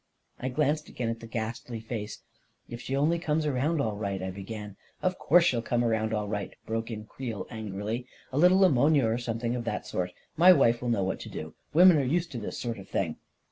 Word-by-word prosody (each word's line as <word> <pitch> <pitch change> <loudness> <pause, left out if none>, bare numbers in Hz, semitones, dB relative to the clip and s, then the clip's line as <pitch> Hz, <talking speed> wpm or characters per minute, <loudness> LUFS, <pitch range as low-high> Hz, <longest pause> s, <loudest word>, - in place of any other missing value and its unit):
I 130 - -2
glanced 150 +3 0
again 120 -2 -3
at 115 0 -3
the 115 - -9
ghastly 115 +1 -4
face. 110 -2 -6 0.4
44 - - -13
If 120 - -6
she 135 - -3
only 155 +5 +2
comes 155 -1 0
around 150 +3 +1
all 110 -7 0
right," 100 -2 -3
I 95 0 -3
began. 105 +2 -7 0.3
44 - - +1
Of 185 - -2
course 175 +1 +5
she'll 125 -9 +2
come 120 +1 0
around 110 -2 +1
all 105 -1 -1
right," 105 -2 -4
broke 115 +1 -2
in 110 -2 -6
Creel 115 -2 -5
angrily. 110 +2 -4 0.2
44 135 - 0
A - - +4
little 185 +2 +6
ammonia, 145 -3 +4
or 115 +2 +1
something 115 0 -2
of 120 - -3
that - - -3
sort. 90 0 -2 0.2
My 180 +3 +8
wife 120 -7 +3
will 125 - -2
know 110 -5 +2
what 95 - -2
to - - -8
do— 80 0 -7
» - - -42
women 180 0 +8
are - - +1
used 165 +6 0
to 120 - -4
this 105 - -5
sort 115 -3 -3
of 95 - -12
thing." 80 -5 -1
120 Hz, 240 wpm, -28 LUFS, 110-145 Hz, 0.4 s, My